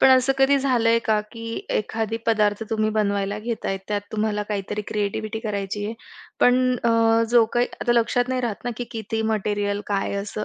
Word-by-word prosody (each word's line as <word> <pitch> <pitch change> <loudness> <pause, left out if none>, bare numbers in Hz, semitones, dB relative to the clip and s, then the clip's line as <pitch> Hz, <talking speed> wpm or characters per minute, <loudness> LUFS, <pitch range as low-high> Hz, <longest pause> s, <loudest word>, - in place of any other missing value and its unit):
पण - - +7
असं 255 +1 +2
कधी 275 +1 +5
झालंय 235 -4 +3
का, 215 -1 +2
की 230 +2 -7 0.2
एखादी 225 +1 -1
पदार्थ 210 -1 +2
तुम्ही 215 -1 +1
बनवायला 200 -1 0
घेताय, 220 -3 -3
त्यात 205 -1 0
तुम्हाला 210 -1 0
काहीतरी 210 0 -3
क्रिएटिव्हिटी 215 +1 -2
करायची 205 -2 -3
आहे, 225 - -4 0.5
पण 255 0 +4
अ, 230 0 +4
जो 240 -2 +6
काही 240 +1 +3
आता 240 - +2
लक्षात 240 +1 +2
नाही 255 0 0
राहत 235 -1 -3
ना, 245 - -1
की 245 - -3
किती 220 -1 -3
मटेरिअल 205 -1 -1
काय 200 -1 -1
असं. 205 +1 -4
220 Hz, 180 wpm, -23 LUFS, 205-235 Hz, 0.5 s, पण